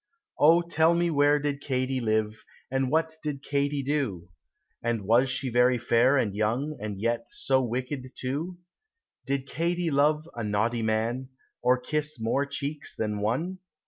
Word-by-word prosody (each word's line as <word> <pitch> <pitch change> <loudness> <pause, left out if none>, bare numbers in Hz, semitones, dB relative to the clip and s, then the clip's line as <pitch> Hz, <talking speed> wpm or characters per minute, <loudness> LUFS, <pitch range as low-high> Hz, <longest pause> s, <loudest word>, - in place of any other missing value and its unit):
Oh 165 +3 +6
tell 170 0 +3
me 170 0 +1
where 145 0 +4
did 145 -1 -2
Katy 130 -1 -1
live, 110 -2 -1 0.3
And 135 -1 +1
what 160 +1 0
did 145 -3 -4
Katy 140 0 0
do? 130 - -2 0.5
And 115 -3 -1
was 120 +6 +4
she 130 0 -1
very 125 +1 +4
fair 120 +3 +3
and 105 -6 0
young, 120 +8 0
And 105 -2 -4
yet 115 +2 0
so 130 +2 +1
wicked, 130 +2 -4
too? 150 +8 -3 0.7
Did 135 -1 -1
Katy 170 +3 -1
love 150 +2 +2
a 115 - -4
naughty 110 +3 0
man, 115 +4 -1 0.3
Or 125 +1 +3
kiss 150 +1 -2
more 135 +6 0
cheeks 140 +1 -4
than 105 -2 -2
one? 160 - -1
130 Hz, 155 wpm, -27 LUFS, 115-150 Hz, 0.7 s, Oh